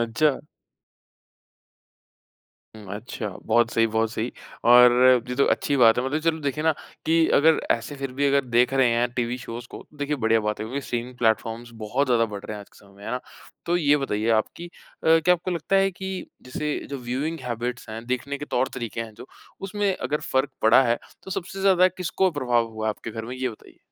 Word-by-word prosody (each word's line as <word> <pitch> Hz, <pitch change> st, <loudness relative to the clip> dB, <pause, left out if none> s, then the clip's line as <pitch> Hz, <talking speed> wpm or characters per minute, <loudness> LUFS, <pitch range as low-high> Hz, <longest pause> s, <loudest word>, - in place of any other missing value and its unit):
अच्छा। 130 Hz, +5 st, +1 dB, 2.4 s
हुँ, 105 Hz, -2 st, -12 dB
अच्छा। 110 Hz, 0 st, -5 dB, 0.2 s
बहुत 120 Hz, -1 st, +3 dB
सही, 115 Hz, 0 st, +3 dB
बहुत 110 Hz, 0 st, 0 dB
सही। 115 Hz, +2 st, -3 dB, 0.3 s
और 125 Hz, 0 st, +8 dB, 0.4 s
ये 125 Hz, -, -2 dB
तो 140 Hz, -, +4 dB
अच्छी 145 Hz, -, -1 dB
बात 115 Hz, -3 st, +6 dB
है। 125 Hz, -, 0 dB
मतलब 150 Hz, +4 st, -1 dB
चलो 165 Hz, 0 st, +1 dB
देखिए 145 Hz, +2 st, -2 dB
ना 160 Hz, -, +4 dB, 0.3 s
कि 165 Hz, 0 st, +4 dB
अगर 160 Hz, +2 st, +5 dB
ऐसे 120 Hz, +5 st, 0 dB
फिर 135 Hz, -2 st, -5 dB
भी 140 Hz, +2 st, 0 dB
अगर 140 Hz, 0 st, +2 dB
देख 125 Hz, +2 st, +2 dB
रहे 130 Hz, -2 st, +4 dB
हैं 120 Hz, +1 st, +1 dB
टीवी 120 Hz, 0 st, -2 dB
शोज़ 120 Hz, -1 st, -7 dB
को -, -, -9 dB
देखिए 145 Hz, 0 st, -2 dB
बढ़िया 115 Hz, -3 st, +2 dB
बात 105 Hz, 0 st, -2 dB
है 110 Hz, -, -3 dB
क्योंकि 135 Hz, +5 st, -3 dB
स्ट्रीमिंग 120 Hz, +1 st, -4 dB
प्लेटफॉर्म्स 115 Hz, +1 st, 0 dB
बहुत 130 Hz, +6 st, 0 dB
ज़्यादा 120 Hz, -2 st, +3 dB
बढ़ 105 Hz, -2 st, -8 dB
रहे 110 Hz, -, -5 dB
हैं -, -, -8 dB
आज 100 Hz, -, -13 dB
के -, -, -21 dB
समय 100 Hz, -1 st, -20 dB
में 100 Hz, -, -13 dB
है 110 Hz, -, -4 dB
ना? 125 Hz, +1 st, -2 dB, 0.5 s
तो 175 Hz, +1 st, +2 dB
ये 150 Hz, -4 st, +3 dB
बताइए 110 Hz, -6 st, -2 dB
आप 110 Hz, -1 st, +3 dB
कि 170 Hz, -, -7 dB
अ, -, -, -14 dB, 0.5 s
क्या 180 Hz, +3 st, +4 dB
आपको 180 Hz, +2 st, -5 dB
लगता 175 Hz, +2 st, 0 dB
है 195 Hz, 0 st, +3 dB
कि 190 Hz, +1 st, -6 dB, 0.2 s
जैसे 150 Hz, +4 st, -3 dB
जो 140 Hz, -, -4 dB
व्यूइंग 135 Hz, +7 st, -3 dB
हैबिट्स 120 Hz, 0 st, -4 dB
हैं 115 Hz, +1 st, -7 dB
देखने 135 Hz, +3 st, -3 dB
के 145 Hz, -, -5 dB
तौर-तरीके 125 Hz, -4 st, -2 dB
हैं 110 Hz, -2 st, -7 dB
जो 115 Hz, -, -11 dB, 0.3 s
उसमें 200 Hz, 0 st, -1 dB
अगर 145 Hz, +4 st, -2 dB
फर्क 130 Hz, +2 st, +2 dB
पड़ा 110 Hz, +4 st, +6 dB
है 120 Hz, -2 st, +1 dB, 0.2 s
तो -, -, -10 dB
सबसे 190 Hz, +1 st, -5 dB
ज्यादा 185 Hz, -2 st, +5 dB
किसको 185 Hz, +1 st, 0 dB
प्रभाव 125 Hz, -6 st, +1 dB
हुआ 110 Hz, 0 st, -4 dB
है 110 Hz, -, +2 dB
आपके 110 Hz, -, -7 dB
घर 110 Hz, 0 st, -6 dB
में 125 Hz, +3 st, -6 dB
ये 130 Hz, 0 st, -1 dB
बताइए? 110 Hz, -, -13 dB
125 Hz, 215 wpm, -24 LUFS, 115-150 Hz, 2.4 s, और